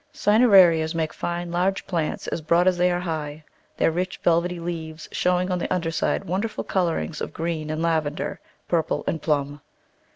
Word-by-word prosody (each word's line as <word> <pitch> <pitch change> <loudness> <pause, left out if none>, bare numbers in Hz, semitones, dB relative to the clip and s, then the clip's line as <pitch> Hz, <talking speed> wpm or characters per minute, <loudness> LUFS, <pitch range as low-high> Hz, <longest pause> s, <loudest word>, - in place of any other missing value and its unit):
Cinerarias 190 -7 +5
make 160 -1 -1
fine, 175 0 -4
large 185 +3 0
plants, 165 -4 -2
as 165 - -3
broad 170 +3 +3
as 185 - +4
they 180 0 +4
are 175 0 0
high, 155 -3 -4 0.3
their - - +3
rich, 185 +3 -2
velvety 175 +1 +2
leaves 165 -2 -6
showing 180 +1 +1
on 180 - 0
the - - -4
un 180 - +1
der 165 -1 -2
side 165 - -1
wonderful 200 +6 -2
colourings 170 -4 -1
of - - -4
green 160 -2 -3
and 155 +1 -2
lavender, 155 -3 -1 0.3
purple 165 -2 0
and 160 - -2
plum. 145 -2 -1
170 Hz, 175 wpm, -24 LUFS, 160-180 Hz, 0.3 s, Cinerarias